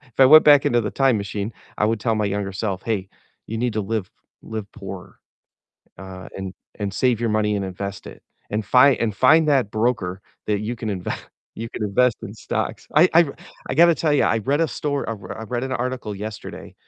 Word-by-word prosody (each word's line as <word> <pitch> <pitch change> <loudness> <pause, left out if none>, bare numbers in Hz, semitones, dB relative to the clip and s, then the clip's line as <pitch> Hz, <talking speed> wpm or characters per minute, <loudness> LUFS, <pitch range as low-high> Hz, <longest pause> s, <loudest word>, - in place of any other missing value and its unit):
if 125 -5 -27
I 130 - +9
went 155 +3 +9
back 145 -2 +6
into 120 0 +3
the 105 - -3
time 135 -4 +2
machine, 100 +2 -4 0.3
I 105 - +3
would 115 0 0
tell 115 0 +1
my 105 -1 0
younger 100 0 -2
self, 95 -1 -3
"Hey, 100 -4 -2 0.4
you 115 - -4
need 120 +1 -1
to 110 - 0
live 105 -2 -3 0.3
live 110 -2 -6
poor, 95 -4 -9 0.8
uh, 95 -1 -9
and 95 -1 -6 0.2
and 100 -2 -3
save 125 +1 +1
your 115 - 0
money 105 -1 +1
and 100 - -2
invest 100 +1 -6
it, - - -11 0.3
and 105 +1 -2
fi 130 +5 +6
and 110 -3 -2
find 155 +8 +5
that 135 -8 +2
broker 110 -5 -1 0.2
that 105 -1 0
you 110 +3 -3
can 110 -1 -5
inve 95 -4 -3 0.4
you 115 +1 -6
can 110 - -5
invest 115 +3 +2
in 100 - -7
stocks." 110 - -4
I 170 +4 +6
I 170 0 +6 0.4
I - - -2
gotta 170 +3 +6
tell 155 -2 +1
you, - - +3
I 115 - +2
read 140 +8 +1
a 165 - +1
stor 145 -2 -2
I - - -1
r 100 -3 -8
I - - -5
read 120 +3 -3
an 130 - -4
article 125 -4 -3
yesterday, 105 +1 -8
110 Hz, 220 wpm, -22 LUFS, 100-125 Hz, 0.8 s, I